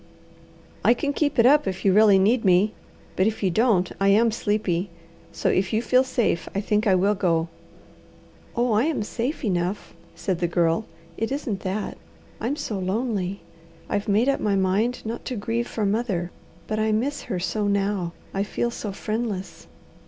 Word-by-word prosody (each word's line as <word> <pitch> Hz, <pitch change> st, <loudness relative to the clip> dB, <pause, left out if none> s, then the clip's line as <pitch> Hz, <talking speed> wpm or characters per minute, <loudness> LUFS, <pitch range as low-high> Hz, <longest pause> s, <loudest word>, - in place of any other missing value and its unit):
"I 240 Hz, -, +5 dB
can 285 Hz, +3 st, -1 dB
keep 290 Hz, 0 st, 0 dB
it 230 Hz, -, +5 dB
up 285 Hz, -2 st, +5 dB
if 190 Hz, +1 st, -4 dB
you 195 Hz, -, +5 dB
really 210 Hz, -1 st, +6 dB
need 220 Hz, +5 st, +3 dB
me, 190 Hz, +2 st, +4 dB, 0.4 s
but 185 Hz, -, +3 dB
if 220 Hz, -1 st, -2 dB
you 190 Hz, -, +2 dB
don't 195 Hz, -3 st, +2 dB
I 195 Hz, -, +2 dB
am 220 Hz, +3 st, +5 dB
sleepy. 205 Hz, -4 st, -1 dB, 0.4 s
So, -, -, -1 dB
if 190 Hz, -1 st, +1 dB
you 220 Hz, +2 st, +1 dB
feel 255 Hz, +2 st, +4 dB
safe, 235 Hz, -9 st, 0 dB
I -, -, +1 dB
think 210 Hz, +2 st, 0 dB
I 190 Hz, -, +5 dB
will 195 Hz, +3 st, +3 dB
go." 170 Hz, -4 st, 0 dB, 1.1 s
"Oh 240 Hz, 0 st, +1 dB
I 215 Hz, +4 st, +3 dB
am 305 Hz, -9 st, 0 dB
safe 245 Hz, +6 st, -3 dB
enough," 180 Hz, 0 st, -2 dB, 0.2 s
said 185 Hz, -4 st, -2 dB
the 175 Hz, -, +1 dB
Girl. 170 Hz, +4 st, +1 dB, 0.3 s
"It 225 Hz, +3 st, -2 dB
isn't 270 Hz, -8 st, -2 dB
that. 195 Hz, +2 st, -4 dB, 0.4 s
I'm 245 Hz, +6 st, -1 dB
so 230 Hz, -9 st, -4 dB
lonely. 195 Hz, -1 st, -2 dB, 0.5 s
I've 205 Hz, +2 st, -1 dB
made 215 Hz, +5 st, +3 dB
up 275 Hz, -, +2 dB
my 205 Hz, -2 st, +1 dB
mind 195 Hz, +7 st, 0 dB
not 230 Hz, +2 st, -4 dB
to 255 Hz, -, -3 dB
grieve 230 Hz, +3 st, -2 dB
for 215 Hz, -, -2 dB
mother, 200 Hz, -5 st, -1 dB, 0.3 s
but 215 Hz, 0 st, -2 dB
I 220 Hz, 0 st, +1 dB
miss 255 Hz, +7 st, -1 dB
her 190 Hz, -, -1 dB
so 205 Hz, +4 st, -1 dB
now. 200 Hz, -3 st, 0 dB, 0.2 s
I 195 Hz, -, 0 dB
feel 235 Hz, +3 st, -1 dB
so 215 Hz, -3 st, -5 dB
friendless." 215 Hz, -1 st, -4 dB
210 Hz, 180 wpm, -24 LUFS, 190-235 Hz, 1.1 s, really